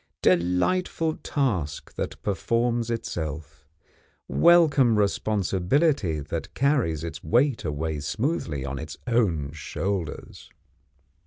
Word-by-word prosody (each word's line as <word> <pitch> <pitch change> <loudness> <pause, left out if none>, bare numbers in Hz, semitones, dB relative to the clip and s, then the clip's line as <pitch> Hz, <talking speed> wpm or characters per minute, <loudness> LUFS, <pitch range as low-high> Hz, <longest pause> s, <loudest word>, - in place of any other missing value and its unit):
Delightful 95 - +1
task 95 - -2
that - - -4
performs 115 +3 0
itself! 80 - -5 0.6
Welcome 150 -9 +5
responsibility 100 - +1
that 80 +3 -5
carries 125 - +1
its 80 -3 -6
weight 120 - +2
away 75 0 -2
smoothly 80 - -2
on 70 0 -4
its 80 -1 -7
own 95 - +1
shoulders! 80 +3 -4
95 Hz, 90 wpm, -25 LUFS, 80-125 Hz, 0.6 s, Welcome